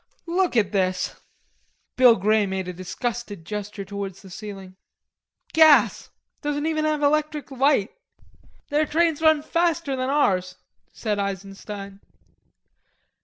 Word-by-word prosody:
"Look 350 -5 0
at 205 -4 +2
this," 185 -2 0 0.8
Bill 250 -2 +7
Grey 210 +1 +2
made 190 -1 -3
a 180 - -4
disgusted 205 +1 -5
gesture 210 +1 -5
towards 195 -1 -6
the 190 - -13
ceiling. 195 -2 -9 0.8
"Gas. 315 -2 +5 0.3
Don't 290 0 -2
even 310 -1 0
have 305 -1 0
electric 300 0 0
light." 265 -5 +2 0.8
"Their 300 +1 +1
trains 325 0 +1
run 315 -2 +4
faster 335 -3 0
than 255 0 -2
ours," 185 -11 +1 0.4
said 210 -3 -3
Eisenstein. 195 0 -6
225 Hz, 120 wpm, -24 LUFS, 195-300 Hz, 0.8 s, Bill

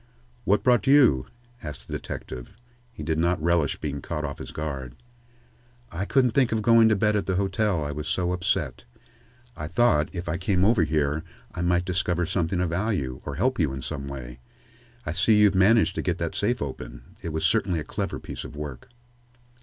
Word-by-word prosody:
"What 100 +2 +2
brought 125 +1 +3
you?" 130 - +5 0.3
asked 70 -4 -7
the - - -7
detective. 60 +7 -6 0.4
He 95 - -8
did 80 +1 -1
not 85 +1 +2
relish 85 -2 +1
being 70 -2 -4
caught 75 +2 -3
off 70 - -6
his - - -7
guard. 70 -5 -5 1.0
"I 90 +4 -3
couldn't 125 +1 +3
think 130 0 +3
of 110 -1 0
going 115 0 +6
to 110 - +4
bed 105 +2 +2
at 105 - -1
the 95 - 0
hotel, 95 -2 0
I 75 - -3
was 75 +1 -5
so 90 -1 0
upset. 75 -8 -1 0.7
I 75 - -5
thought, 85 -7 +3
if 90 -1 -6
I 85 0 -1
came 95 0 +1
over 105 -6 +4
here, 75 0 0 0.3
I - - -4
might 90 0 +2
discover 90 -2 0
something 90 +1 -1
of 90 -2 0
value, 85 - -1
or 70 - -3
help 125 - 0
you 75 -6 +1
in 65 -1 -6
some 70 -4 -5
way. 65 -3 -8 0.7
I 75 - -2
see 100 +5 +3
you've 105 -1 +5
managed 100 +4 +4
to - - -2
get 90 -1 -1
that 85 -2 -3
safe 120 0 0
open. - - -7 0.2
It 85 - -4
was 80 0 -2
certainly 95 -6 +2
a - - -4
clever - - -4
piece - - -7
of - - -9
work." 75 -4 -7
85 Hz, 200 wpm, -25 LUFS, 75-100 Hz, 1.0 s, going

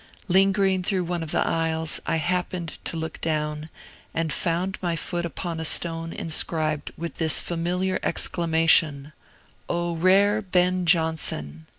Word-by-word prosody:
Lingering 195 0 +3
through 185 0 0
one 175 0 -3
of 160 - -5
the - - 0
aisles, 160 -1 +1
I - - +1
happened 175 0 -2
to 165 - -3
look 160 0 -6
down, 150 -1 -2 0.5
and 165 -1 -1
found 180 +3 -2
my 175 -2 -1
foot 175 +1 -3
upon 170 +1 -5
a - - -3
stone 165 +1 0
inscribed 155 -2 -2
with 170 +1 -6
this 160 -2 +5
familiar 180 +2 -1
exclamation, 160 -4 +2 0.6
"O 175 0 -1
rare 200 +5 +3
Ben 180 -2 +1
Jonson!" 155 - 0
165 Hz, 135 wpm, -24 LUFS, 160-180 Hz, 0.6 s, this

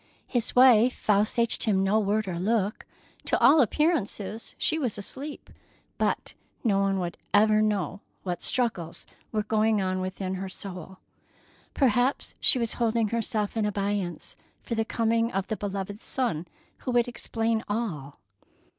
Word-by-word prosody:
His 240 -3 -1
wife 250 -1 +6
vouchsafed 215 +3 +2
him 195 -4 +2
no 200 +3 +3
word 210 0 0
or 175 -2 -3
look. 210 +1 0 0.4
To - - +2
all 310 - +7
appearances, 230 - -1
she 320 - +1
was 245 -8 -1
asleep, 275 +9 -7 0.5
but - - -1 0.3
no 205 -5 +2
one 195 -3 0 0.2
ever 215 +1 +5
knew 205 -2 0 0.2
what 180 -2 -3
struggles 205 -10 -1 0.3
were 215 -1 0
going 220 0 +2
on 185 -1 -1
within 185 0 -3
her 195 - -4
soul. 185 -1 -8 0.8
Perhaps 250 0 +2
she - - +5
was 230 -2 0
holding 230 -2 +2
herself 225 -2 -2
in 220 - +1
abeyance 200 -4 -2 0.3
for - - -4
the 225 -1 +1
coming 230 +1 +1
of 195 0 -1
the 220 - 0
beloved 200 +1 -5
son 220 -11 -2 0.3
who - - -6
would 240 0 +3
explain 225 -2 -1
all. 180 - -3
215 Hz, 145 wpm, -27 LUFS, 195-230 Hz, 0.8 s, all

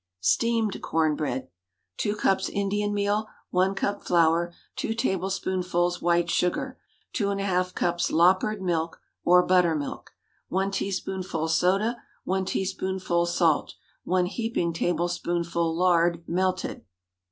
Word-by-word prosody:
STEAMED 225 - +1
CORN 160 -2 +1
BREAD. 130 -4 -2
✠ - - -26 0.5
2 205 - 0
cups 195 -2 +1
Indian 205 +1 -1
meal. 205 +1 0 0.2
1 185 +2 +2
cup 200 +1 -1
flour. 170 0 +2 0.3
2 225 - -2
tablespoonfuls 185 -4 -1
white 170 0 +2
sugar. 180 +1 -1 0.3
2½ 195 -3 0
cups 175 0 0
"loppered" 185 +4 +3
milk, 165 -2 -1 0.2
or 180 +1 +5
buttermilk. 170 -5 +1 0.4
1 195 +2 0
teaspoonful 190 -4 -2
soda. 195 +8 +2 0.3
1 190 0 -1
teaspoonful 190 -2 -1
salt. 170 -3 +1 0.3
1 180 0 +1
heaping 195 -4 -1
tablespoonful 170 0 -1
lard, 170 -1 +3
melted. 185 +1 -1
180 Hz, 110 wpm, -26 LUFS, 170-195 Hz, 0.5 s, or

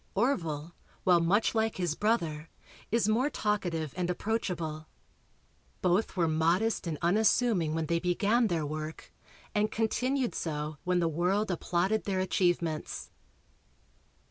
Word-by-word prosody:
Orville, 170 - 0 0.3
while 180 -2 +5
much 190 +7 +2
like 220 -1 0
his 175 -4 0
brother, 165 -7 -1 0.4
is 230 -1 +2
more 240 +6 +2
talkative 175 - -1
and 180 -1 -1
approachable. 175 -6 -2 1.0
Both 185 +3 +1
were 170 -2 +3
modest 170 +6 +1
and 160 -2 -2
unassuming 200 -3 +3
when 160 -1 -1
they 170 +2 +1
began 205 +7 +2
their 165 -5 -1
work 155 +1 -6 0.4
and 210 +1 +2
continued 250 +3 0
so 150 -1 -3
when 180 -1 +2
the 170 - +2
world 180 +6 +1
applauded 180 +4 0
their 190 -2 0
achievements. 175 -4 -1
180 Hz, 125 wpm, -30 LUFS, 165-215 Hz, 1.0 s, while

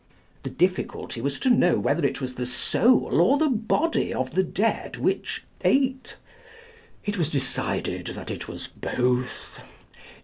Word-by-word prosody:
The - - -5
difficulty 180 -8 -1
was 140 +2 -2
to 260 - +3
know 180 -7 +4
whether 170 - 0
it - - 0
was 130 -2 -4
the 125 0 -4
soul 160 - +3
or 265 +11 +5
the 310 0 +2
body 245 +8 +1
of 130 +1 -2
the 190 - +3
dead 205 +4 -1
which - - -1 0.2
ate. 265 -1 +1 0.9
It 205 -2 -2
was 160 -3 +1
decided 135 -4 -2
that - - -6
it - - -5
was - - -6
both. 125 0 -2
175 Hz, 145 wpm, -25 LUFS, -, 0.9 s, or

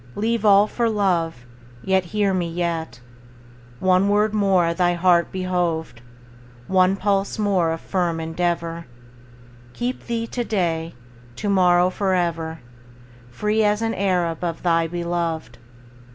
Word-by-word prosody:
Leave 225 +1 -1
all 205 -1 +6
for 230 +2 -1
love; 170 - 0 0.4
Yet, 190 -1 +1
hear 200 +2 0
me, 175 -2 -1
yet, 165 -4 -3 0.8
One 185 +1 +3
word 210 +1 +2
more 190 -5 +2
thy 175 0 +1
heart 175 -1 +3
behoved, 175 -8 -2 0.6
One 185 +2 +3
pulse 195 0 0
more 195 -6 +1
of 165 - -4
firm 175 -3 -1
endeavor, 170 0 -2 0.9
Keep 245 +2 -4
thee 230 -1 -2
to 240 +1 -3
day, 170 - -2 0.4
To 205 - -3
morrow, 180 -2 +4
forever, 170 -5 -1 0.7
Free 210 - 0
as 210 +1 +1
an 225 0 0
Arab 180 -4 -1
Of 170 -2 -3
thy 165 -2 +2
beloved. 170 -6 -3
180 Hz, 125 wpm, -22 LUFS, 170-200 Hz, 0.9 s, all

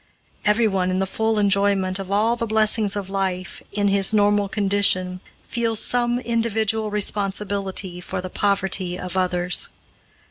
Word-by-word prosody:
Everyone 210 -4 +2
in 185 - 0
the 190 - +1
full 220 +3 -1
enjoyment 200 -2 +2
of 195 -1 -6
all 215 +4 +2
the 235 -1 -3
blessings 215 -1 +2
of 200 -2 -4
life, 190 -1 -3
in 205 -1 0
his 195 +1 +2
normal 205 -1 +3
condition, 195 -3 +1 0.3
feels 230 -2 0
some 240 +1 +1
individual 225 -2 0
responsibility 200 -2 -1
for - - -5
the 185 - -5
poverty 190 -2 -1
of 180 0 -6
others. 180 -1 0
200 Hz, 140 wpm, -22 LUFS, 190-215 Hz, 0.3 s, normal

